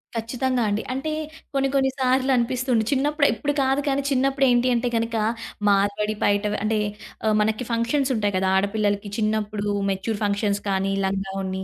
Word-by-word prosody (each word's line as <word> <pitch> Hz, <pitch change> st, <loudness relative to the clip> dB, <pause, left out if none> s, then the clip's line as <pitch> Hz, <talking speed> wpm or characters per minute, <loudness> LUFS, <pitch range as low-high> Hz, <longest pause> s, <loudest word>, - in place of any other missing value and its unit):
ఖచ్చితంగా 245 Hz, +2 st, -1 dB
అండి. 205 Hz, +2 st, -1 dB
అంటే 270 Hz, +4 st, -3 dB, 0.4 s
కొన్ని 275 Hz, 0 st, +1 dB
కొన్ని 265 Hz, -1 st, +3 dB
సార్లనిపిస్తుంది. 255 Hz, -2 st, +2 dB
చిన్నప్పుడు 285 Hz, +1 st, +2 dB
ఇప్పుడు 290 Hz, 0 st, -2 dB
కాదు 270 Hz, +2 st, +1 dB
కానీ 275 Hz, 0 st, +1 dB
చిన్నప్పుడేంటి 265 Hz, -2 st, +3 dB
అంటే 240 Hz, +1 st, 0 dB
గనక, 230 Hz, 0 st, -2 dB, 0.5 s
మార్వాడి 205 Hz, +2 st, +1 dB
పైట 205 Hz, +1 st, +2 dB
వ -, -, 0 dB
అంటే 215 Hz, 0 st, +1 dB, 0.5 s
ఆహ్, 215 Hz, -1 st, +3 dB
మనకి 220 Hz, +3 st, 0 dB
ఫంక్షన్సుంటాయి 230 Hz, -2 st, 0 dB
కదా! 190 Hz, 0 st, +1 dB
ఆడ 190 Hz, -, +3 dB
పిల్లలకి 205 Hz, -1 st, 0 dB
చిన్నప్పుడు 215 Hz, -1 st, -1 dB, 0.2 s
మెచ్యూర్ 195 Hz, +3 st, -2 dB
ఫంక్షన్స్ 205 Hz, 0 st, 0 dB
కానీ, 195 Hz, 0 st, 0 dB
లంగా 195 Hz, 0 st, -2 dB
ఓణి 190 Hz, 0 st, -3 dB
225 Hz, 150 wpm, -23 LUFS, 205-260 Hz, 0.5 s, కొన్ని